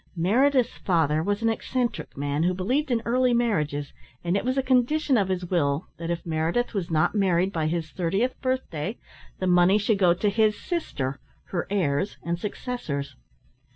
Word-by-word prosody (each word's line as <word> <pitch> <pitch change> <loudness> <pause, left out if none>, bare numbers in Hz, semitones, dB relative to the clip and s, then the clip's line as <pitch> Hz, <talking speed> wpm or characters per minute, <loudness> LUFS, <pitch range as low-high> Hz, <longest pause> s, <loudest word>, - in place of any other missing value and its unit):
Meredith's 245 +8 +2
father 160 -4 +2
was 205 +5 -1
an 225 - +3
eccentric 240 - -2
man 145 +1 -1
who 180 +2 +2
believed 255 - 0
in 235 -2 0
early 250 +1 +2
marriages, 150 - 0 0.3
and 175 +2 0
it 200 - 0
was 255 +2 -1
a 270 - +2
condition 265 +3 +2
of 200 -5 +2
his 185 -1 -2
will 160 -2 0
that 165 0 -5
if 170 0 -3
Meredith 165 +10 0
was 190 -4 -2
not 160 +1 +2
married 190 -2 +2
by 160 -2 0
his 160 -1 -2
thirtieth 195 +8 0
birthday, 235 - -2 0.4
the 185 - -3
money 180 +2 +5
should 205 0 +1
go 175 -3 +5
to 205 +4 +1
his 215 0 +2
sister, 140 - -3 0.3
her 175 - -2
heirs 190 -2 0
and 170 0 -2
successors. 180 - -4
190 Hz, 175 wpm, -26 LUFS, 165-235 Hz, 0.4 s, money